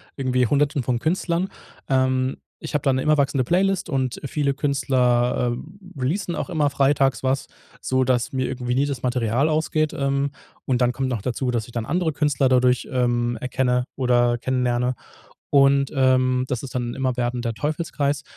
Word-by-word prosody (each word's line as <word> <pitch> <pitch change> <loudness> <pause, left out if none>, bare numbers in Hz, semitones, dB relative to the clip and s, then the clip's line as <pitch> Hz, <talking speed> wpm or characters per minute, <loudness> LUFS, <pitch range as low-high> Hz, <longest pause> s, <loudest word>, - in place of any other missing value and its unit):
irgendwie 125 -3 +1
Hunderten 145 0 +1
von 120 -1 0
Künstlern. 170 +4 0 0.4
Ähm, 130 0 +1 0.2
ich - - -7
habe 145 - +1
da 135 - +2
'ne 130 - 0
immer 155 +1 +3
wachsende 140 -2 +1
Playlist 190 +5 +1
und 130 -4 -1
viele 140 0 0
Künstler, 125 -4 +1
äh, 185 +4 -11
releasen 170 +6 -1
auch - - -4
immer 150 -4 +1
freitags 135 -1 +2
was, 130 +1 0 0.4
sodass 130 -1 +1
mir 130 -1 0
irgendwie 125 -1 -3
nie 140 +2 +2
das 135 -4 -4
Material 125 +3 +1
ausgeht. 155 0 0
Ähm, 140 0 0 0.3
und 125 -1 0
dann 125 - +3
kommt 130 +1 -2
noch 115 -5 -2
dazu, 125 +2 -2
dass 115 -3 -1
ich - - -13
dann 115 -2 -3
andere 170 +2 0
Künstler 140 -3 +1
dadurch, 125 -1 +3
ähm, 120 -2 0
erkenne 125 0 0
oder 120 -2 +2
kennenlerne. 125 0 0 0.6
Und, 140 0 +4
ähm, 130 -1 +3
das 125 0 -3
ist 130 - -8
dann 120 -1 -1
'n - - -9
immer 130 -2 -1
werdender 120 -1 -1
Teufelskreis. 145 +2 -2
130 Hz, 175 wpm, -23 LUFS, 125-140 Hz, 0.6 s, Und